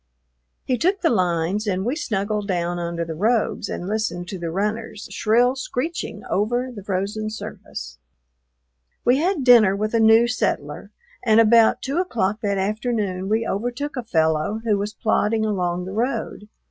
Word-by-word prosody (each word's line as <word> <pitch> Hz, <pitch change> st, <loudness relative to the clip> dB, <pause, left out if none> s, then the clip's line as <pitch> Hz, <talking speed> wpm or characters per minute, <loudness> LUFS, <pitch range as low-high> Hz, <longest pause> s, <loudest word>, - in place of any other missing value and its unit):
He 250 Hz, -3 st, 0 dB
took 380 Hz, +7 st, +1 dB
the 330 Hz, -, +3 dB
lines 185 Hz, +1 st, 0 dB
and 190 Hz, -1 st, -1 dB
we 250 Hz, +5 st, 0 dB
snuggled 210 Hz, -, -2 dB
down 175 Hz, -2 st, -1 dB
under 170 Hz, 0 st, -3 dB
the 165 Hz, -, -5 dB
robes 215 Hz, +7 st, 0 dB
and 175 Hz, -, -4 dB
listened 210 Hz, -4 st, -2 dB
to 190 Hz, -, -5 dB
the 170 Hz, -1 st, -3 dB
runners, 210 Hz, +4 st, -3 dB
shrill 240 Hz, +4 st, +2 dB
screeching 270 Hz, +5 st, -4 dB
over 240 Hz, +5 st, 0 dB
the 205 Hz, -5 st, -9 dB
frozen 200 Hz, +3 st, -2 dB
surface. 65 Hz, -, -8 dB, 1.1 s
We 245 Hz, +2 st, +5 dB
had 335 Hz, -1 st, 0 dB
dinner 230 Hz, -6 st, +6 dB
with 215 Hz, +2 st, -2 dB
a 230 Hz, -, +3 dB
new 225 Hz, +1 st, +6 dB
settler, 245 Hz, -, -2 dB, 0.3 s
and 220 Hz, -2 st, +4 dB
about 230 Hz, 0 st, +5 dB
two 275 Hz, +4 st, -2 dB
o'clock 220 Hz, -, -1 dB
that 200 Hz, -2 st, 0 dB
afternoon 205 Hz, -2 st, -1 dB
we 225 Hz, +2 st, +1 dB
overtook 245 Hz, +8 st, -3 dB
a 250 Hz, -, -2 dB
fellow 160 Hz, -1 st, 0 dB
who 220 Hz, -3 st, +2 dB
was 210 Hz, +2 st, -4 dB
plodding 220 Hz, 0 st, +1 dB
along 180 Hz, -4 st, -1 dB
the 190 Hz, -, -6 dB
road. 225 Hz, -2 st, -3 dB
215 Hz, 160 wpm, -22 LUFS, 190-240 Hz, 1.1 s, dinner